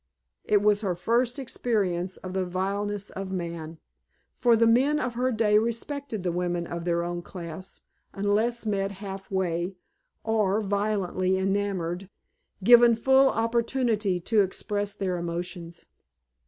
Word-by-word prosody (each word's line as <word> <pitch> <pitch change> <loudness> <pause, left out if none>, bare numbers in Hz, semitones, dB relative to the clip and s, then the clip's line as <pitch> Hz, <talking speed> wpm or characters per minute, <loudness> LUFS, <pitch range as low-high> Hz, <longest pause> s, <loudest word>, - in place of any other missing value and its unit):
It 205 -1 +2
was 210 0 +3
her 190 -4 -1
first 235 +8 +1
experience 195 -9 -1
of 185 0 -8
the 190 0 0
vileness 200 +3 -2
of 195 0 -6
man, 170 -3 -5 0.6
for 240 -2 +5
the 230 +1 +4
men 265 +6 +4
of 250 -4 -2
her 250 +2 0
day 215 -2 +3
respected 235 0 -3
the 180 - 0
women 175 0 -1
of 170 0 -5
their 170 -1 +1
own 175 0 -3
class 175 +1 -8 0.3
unless 215 +4 0
met 200 -2 -1
half 195 0 -8
way, 180 -1 -1 0.5
or, 215 -2 +1
violently 200 -3 0
enamoured, 190 -2 -1 0.5
given 240 +1 +7
full 265 +3 +5
opportunity 230 -4 0
to 215 +4 +3
express 205 +1 -2
their 185 -3 -2
emotions. 170 0 -5
200 Hz, 135 wpm, -27 LUFS, 180-225 Hz, 0.6 s, given